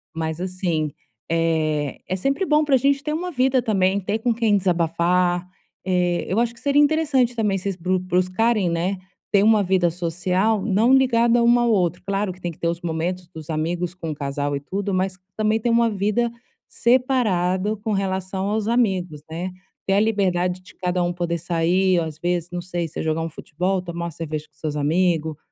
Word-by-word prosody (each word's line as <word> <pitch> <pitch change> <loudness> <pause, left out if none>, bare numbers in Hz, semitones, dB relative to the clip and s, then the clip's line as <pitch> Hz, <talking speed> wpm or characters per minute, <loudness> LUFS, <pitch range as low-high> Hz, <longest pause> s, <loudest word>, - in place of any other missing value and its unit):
mas 160 0 -3
assim, 180 -5 -2 0.4
eh, 155 -4 0
é 185 - -1
sempre 275 - 0
bom 300 -1 +3
pra 285 -3 +4
gente 275 +2 +2
ter 300 - -2
uma 355 +3 -3
vida 260 -2 +2
também, 195 -3 +2
ter 205 +3 -2
com 235 +1 +1
quem 225 -2 +2
desabafar. 175 0 +1 0.4
Eh, 180 -2 +1
eu 190 - 0
acho 235 0 +1
que 235 - -18
seria 285 0 +3
interessante 290 -5 +2
também 210 -4 +1
vocês 195 +1 -3
brus 185 +1 0
buscarem, 185 +3 +1
né, 175 +4 -1 0.3
ter 200 - +4
uma 215 -1 +5
vida 185 -2 +2
social 180 +5 0
não 225 +5 +3
ligada 240 -2 +4
uma 240 +1 +5
ao 235 -1 +2
outro. 180 -4 +1
Claro 200 0 -1
que 180 - -13
tem 175 -1 -3
que - - -16
ter 170 - -1
os 170 0 -2
momentos 175 +2 -3
dos 160 -3 -11
amigos 170 +3 -2
com 165 -3 -5
o 150 - -5
casal 145 0 -2
e 140 - -2
tudo, 195 +7 -3
mas 185 0 -1 0.2
também 215 +1 +1
ter 240 - -1
uma 235 0 +4
vida 210 +3 0 0.4
separado 215 -6 +1
com 215 +2 -4
relação 190 0 -2
aos 215 0 -1
amigos, 190 -10 0
né. 175 +3 -4 0.4
Ter 195 - +2
a 200 - +4
liberdade 185 -4 +1
de 185 - -16
cada 180 -1 -1
um 175 - 0
poder 175 -1 -2
sair 175 +2 +2
ou 165 - -1
as 155 -2 -7
vezes, 175 0 -1
não 175 - -3
sei, 175 -1 -3
se 155 - -8
é - - -2
jogar 160 0 0
um 165 - -3
futebol? 180 +4 -2
Tomar 170 -1 -5
uma 170 - -4
cerveja 155 -1 -5
com 155 - -52
seus 150 0 -4
amigo. 160 0 +1
185 Hz, 200 wpm, -22 LUFS, 170-220 Hz, 0.4 s, uma